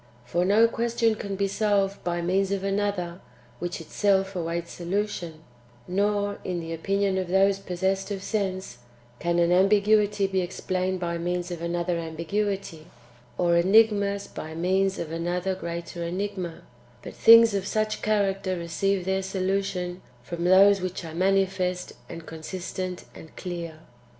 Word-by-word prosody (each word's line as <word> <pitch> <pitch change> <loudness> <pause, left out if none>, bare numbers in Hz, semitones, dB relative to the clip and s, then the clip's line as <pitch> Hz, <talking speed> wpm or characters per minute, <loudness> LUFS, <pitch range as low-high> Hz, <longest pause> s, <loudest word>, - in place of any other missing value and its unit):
For 170 +8 0
no 215 +4 +5
question 230 0 +1
can 200 -2 -5
be 200 +1 0
solved 200 -1 0
by 175 -1 -1
means 190 +2 +1
of 195 -1 -1
another 195 -3 -1 0.4
which 175 0 -4
itself 195 +3 +1
awaits 170 0 -3
solution; 175 -3 -3 0.4
nor, 205 +2 0
in 180 -2 -2
the 165 0 -5
opinion 195 +3 0
of 185 - -3
those 195 +2 +3
possessed 190 +1 -1
of 195 -2 -4
sense, 190 - -3 0.4
can 170 0 0
an 170 0 +3
ambiguity 205 +2 +4
be 190 -1 0
explained 185 +1 -2
by 170 -1 -2
means 175 +1 -2
of 170 -2 -5
another 170 0 -1
ambiguity, 170 +1 -3 0.5
or 175 -1 +3
enigmas 200 +1 +4
by 160 0 -8
means 190 +3 +1
of 165 -2 -5
another 175 +3 -1
greater 170 -1 -5
enigma, 180 -1 -4 0.4
but - - -8
things 230 -1 +8
of 195 -1 -1
such 215 0 -1
character 195 -3 0
receive 175 +3 -1
their 190 0 0
solution 190 -1 -2 0.2
from 170 +5 -4
those 195 +2 +6
which 185 -1 -4
are 160 - -7
manifest, 185 0 0 0.2
and 165 -1 -8
consistent, 180 +3 -5
and 160 - -13
clear. 170 -3 -6
185 Hz, 145 wpm, -26 LUFS, 175-200 Hz, 0.5 s, things